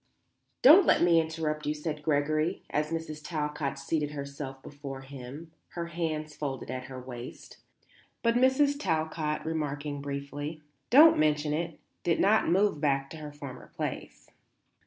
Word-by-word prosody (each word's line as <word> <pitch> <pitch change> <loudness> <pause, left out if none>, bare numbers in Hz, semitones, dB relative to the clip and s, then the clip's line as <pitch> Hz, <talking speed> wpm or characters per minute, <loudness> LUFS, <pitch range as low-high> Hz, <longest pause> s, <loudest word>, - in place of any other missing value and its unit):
"Don't 335 +8 +9
let - - +5
me 170 -1 +5
interrupt 160 -2 -3
you," 150 - 0
said 150 0 -4
Gregory, 155 +3 0
as 150 +1 0
Mrs. 160 -2 -4
Talcott 150 -3 -2
seated 150 +1 -2
herself 140 -1 -6
before 140 -2 -8
him, 135 +4 -9 0.2
her 170 -1 -4
hands 155 -3 -3
folded 135 -4 -4
at 130 0 -4
her 130 0 -8
waist. 125 -1 -9 0.7
But 230 -1 +4
Mrs. 265 +3 +3
Talcott, 155 - -1
remarking 145 -2 -3
briefly, 145 +2 -5 0.3
"Don't 300 +7 +8
mention 150 -1 +2
it," 165 +1 -3 0.2
did 170 - +1
not 210 -1 +4
move 190 -3 +2
back 135 -2 +1
to 160 - -7
her 150 -1 -7
former 140 -3 -9
place. - - -5
150 Hz, 145 wpm, -29 LUFS, 140-165 Hz, 0.7 s, Don't